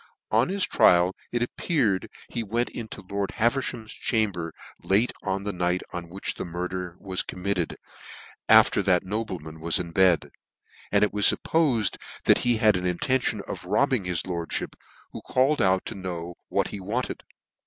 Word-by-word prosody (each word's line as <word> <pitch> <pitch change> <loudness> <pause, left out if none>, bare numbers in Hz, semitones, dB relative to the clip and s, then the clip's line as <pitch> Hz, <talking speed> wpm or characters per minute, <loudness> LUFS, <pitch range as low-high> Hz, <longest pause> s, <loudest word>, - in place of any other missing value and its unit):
On 115 +7 +3
his 195 0 0
trial 90 +1 +4 0.2
it 120 0 0
appeared 120 - 0
that - - -16 0.2
he 120 - -1
went 115 +3 -1
into 110 -3 -7
lord 100 0 -2
Haveriham's 120 -1 -1
chamber 100 -8 -1 0.3
late 105 +6 +2
on 95 0 -2
the 100 0 -3
night 90 0 0
on 85 -1 -5
whicli 95 +3 -3
the - - -3
murder 90 0 -4
was 95 -2 -1
committed, 90 -2 -3 0.7
after - - +6
that 90 -3 +3
nobleman 95 -7 -4
was 85 +1 +2
in 85 -2 -5
bedj 90 -2 +3 0.6
and - - +4
it 105 - +1
was 105 -1 +6
fuppofed 135 - +1 0.3
that - - +5
he 120 -2 +2
had 110 -2 +4
an 90 0 -2
intention 110 +3 0
of - - -6
robbing 115 +2 +1
his 90 -2 -1
lordfhip, 85 -2 -3 0.4
who - - -8
called 135 +4 +2
out 95 0 +2
to - - -4
know 90 -3 -5 0.2
what - - 0
he 100 - -6
wanted. 110 +7 -3
100 Hz, 165 wpm, -26 LUFS, 90-115 Hz, 0.7 s, after